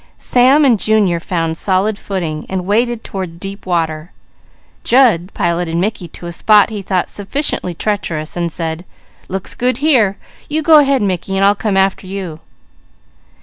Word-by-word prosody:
Sam 265 +4 +4
and 240 -6 +4
Junior 205 -6 +2
found 165 -2 -2
solid 195 +4 +1
footing, 165 -6 -4
and 185 -1 -3
waded 230 +3 0
toward 180 -4 -6
deep 195 +1 -8
water. 160 -1 -2 0.7
Jud 225 -8 +3
piloted 170 -1 -1
Mickey 185 -1 -2
to 170 - -12
a 170 - -5
spot 210 +5 +4
he 210 -2 -4
thought 185 -1 -1
sufficiently 205 - -3
treacherous, 165 -6 -3
and 170 -1 -2
said: 165 0 -4 0.4
"Looks 190 0 -4
good 250 0 0
here; 250 -9 +2 0.3
you 310 +1 -1
go 315 -1 +7
ahead 275 -4 +2
Mickey, 195 0 -2
and 195 - +3
I'll 200 - +5
come 205 -1 -1
after 190 0 +1
you." 185 -5 -6
195 Hz, 155 wpm, -16 LUFS, 175-220 Hz, 0.7 s, go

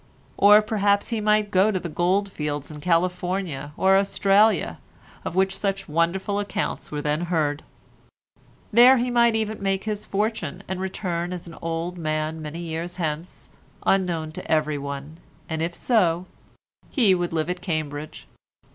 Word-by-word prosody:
Or 210 +1 +7
perhaps 205 -1 +1
he 230 -2 -1
might 210 -1 +2
go 190 +2 +4
to 190 -3 0
the 175 - -5
gold 185 +5 0
fields 150 -3 -4
in 150 -1 -9
California 180 -3 -1
or 190 0 +5
Australia, 195 - +2 0.4
of - - -5
which 190 0 +2
such 195 -1 -2
wonderful 170 +6 0
accounts 205 -2 -3
were 150 -1 -3
then 150 +2 0
heard; 155 -4 0 1.1
there 245 +4 +8
he 245 +1 0
might 235 -1 +4
even 220 -1 -2
make 195 -1 0
his 210 -1 -4
fortune, 205 -7 -2
and 190 0 -3
return 180 -2 -3
as 180 -2 -6
an 165 -1 -10
old 165 +2 -3
man 155 0 -2
many 155 +2 -6
years 170 +1 -4
hence, 160 -1 -4 0.4
unknown 175 -5 +1
to - - -7
everyone, 150 0 -2 0.3
and 160 -1 -3
if 170 +1 -2
so, 180 -7 +2 0.6
he 225 -9 +4
would 175 -1 -1
live 160 -1 -1
at 180 0 -3
Cambridge. 155 -3 -4
180 Hz, 155 wpm, -24 LUFS, 160-200 Hz, 1.1 s, there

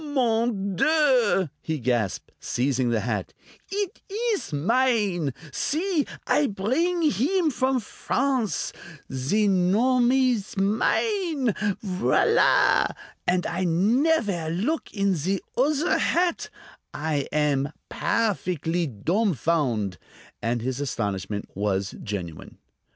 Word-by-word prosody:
"Mon 230 -8 0
Dieu!" 255 - +3
he 160 -1 -2
gasped, 120 -6 -1
seizing 130 -1 0
the 115 -2 +1
hat; 105 -3 -3 0.4
"eet 400 -1 -3
ees 435 - -2
mine! 200 - +1 0.2
See! 320 - 0 0.2
I 295 - +3
bring 280 - 0
heem 310 - +2
from 260 0 +1
France; 250 +1 -1 0.4
zee 170 +12 +1
nom 225 +7 +3
ees 250 -5 +1
mine. 275 - +1 0.3
V'là! 200 - +3 0.3
And 180 0 +2
I 175 +2 -2
nevaire 200 - +2
look 220 - -2
in 200 -2 +1
zee 185 +4 -1 0.2
uzzer 295 +6 +2
hat! 350 0 +1 0.5
I 150 -2 -1
am 145 -2 +1 0.2
_pair_fickly 170 - -1
dumfound'!" 155 - +1 0.4
And 115 0 -1
his 130 +1 -2
astonishment 100 -6 -3
was 100 -1 -1
genuine. 90 -6 -6
195 Hz, 100 wpm, -25 LUFS, -, 0.5 s, Dieu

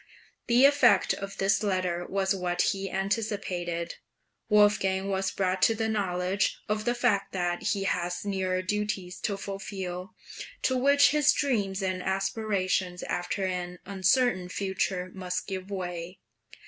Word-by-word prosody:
The 245 +3 +6
effect 265 -8 +5
of 195 0 -6
this 195 +1 +2
letter 185 -4 -1
was 195 0 +1
what 180 -2 0
he 195 0 -4
anticipated. 190 -4 -2 0.5
Wolfgang 205 -2 +3
was 195 0 0
brought 190 -1 -1
to 225 -1 +3
a 225 - +1
knowledge 190 -2 0
of 215 0 -1
the 240 0 +1
fact 235 -5 +1
that 175 -2 -1
he 200 -2 0
had 175 -2 0
nearer 190 -2 -1
duties 195 -2 -2
to 200 - -2
fulfil, 195 -1 -6 0.5
to 260 - +2
which 280 +3 +5
his 300 0 +4
dreams 205 -8 0
and 185 -1 -1
aspirations 190 -2 -1
after 175 +2 -2
an 180 -1 -3
uncertain 190 0 +2
future 185 -1 -2
must 185 -1 -3
give 190 0 -5
way. 180 -2 -5
195 Hz, 135 wpm, -28 LUFS, 185-210 Hz, 0.5 s, The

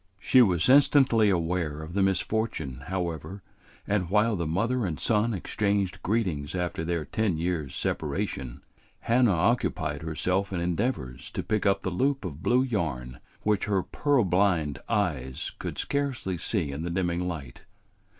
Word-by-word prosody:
She 130 +6 +5
was 90 -7 +3
instantly 130 -5 +5
aware 85 -4 -1
of 80 +2 -8
the 100 - +1
misfortune, 95 - -1
however, 90 0 -4 0.4
and 100 -4 0
while 105 +3 +3
the 85 -4 -2
mother 115 +10 0
and 85 -6 -2
son 110 +1 +2
exchanged 100 -1 -1
greetings 90 -8 -1
after 90 -2 -2
their 85 -2 -2
ten 105 -7 0
years' 80 -4 -2
separation, 65 +1 -3 0.4
Hannah 120 -4 +3
occupied 85 -6 0
herself 90 +5 -1
in 90 - -2
endeavors 85 - -2
to - - -4
pick 105 -1 0
up 100 - +2
the 95 - -1
loop 135 +5 0
of 80 -4 -6
blue 125 +5 +3
yarn 75 - -3 0.2
which 105 -2 +1
her 100 -3 +1
purblind 95 - +1
eyes 70 -11 -1
could - - -5
scarcely 140 -10 -1
see 75 -3 -1
in 70 +3 -5
the 85 - -3
dimming 90 0 -1
light. 70 -8 -6
90 Hz, 150 wpm, -27 LUFS, 80-105 Hz, 0.4 s, She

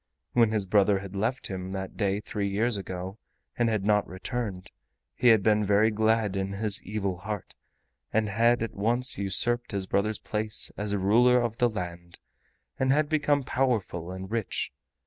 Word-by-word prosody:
When 115 -2 +4
his 105 -2 -1
brother 100 +1 +3
had 100 0 -8
left 115 +6 -1
him 95 0 -5
that 95 -1 -5
day 100 -2 0
three 105 -1 -3
years 110 +4 +1
ago, 95 +1 -6 0.4
and 120 -1 +2
had 105 -3 -1
not 105 -1 +3
returned, 95 0 -5 0.4
he 125 - +2
had 110 -4 +6
been 105 0 +3
very 105 +2 +3
glad 110 -1 +1
in 95 0 -2
his 105 0 +1
evil 100 -2 -3
heart 105 +2 -6 0.6
and 110 0 +1
had 115 +3 +2
at 115 - -4
once 120 +3 0
usurped 120 +5 0
his 100 -1 -2
brother's 105 +3 0
place 105 -1 -1
as 105 0 -2
ruler 120 +6 +4
of 120 -2 -2
the 120 - +4
land, 85 -4 -6 0.6
and 130 0 +2
had 145 +1 +2
become 145 -2 +2
powerful 115 -11 -1
and 95 +1 -7
rich. 115 -3 -2
105 Hz, 170 wpm, -27 LUFS, 95-115 Hz, 0.6 s, had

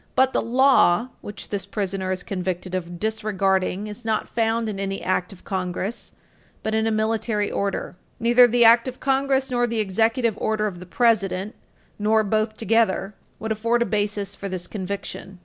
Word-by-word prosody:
But 260 0 +4
the - - +2
"law" 250 -3 +4
which 205 - -9
this 200 -2 -3
prisoner 195 -2 -2
is 185 -1 -3
convicted 185 -1 -4
of 175 -1 -4
disregarding 200 -2 0
is 215 +3 -8
not 220 -1 -1
found 225 0 0
in 205 -2 -4
an 195 0 -2
act 185 -1 -1
of 195 - -14
Congress, 190 +4 -4 0.5
but 220 - -1
in 220 0 +1
a - - +1
military 215 -1 0
order. 200 -2 -2 0.2
Neither 240 +1 +6
the 240 0 +4
Act 230 +2 +6
of 255 0 -6
Congress 270 0 +1
nor 245 -1 +2
the 230 -1 -2
Executive 225 +3 +1
Order 215 -1 0
of 190 -4 -4
the 180 - -10
President, 205 -2 +1 0.5
nor 215 +1 +3
both 215 +1 0
together, 220 -3 +1 0.2
would 220 0 -4
afford 230 +2 +1
a - - -4
basis 205 -1 -1
for 200 - -6
this 185 -1 -4
conviction. 195 -1 -6
215 Hz, 175 wpm, -23 LUFS, 195-230 Hz, 0.5 s, Neither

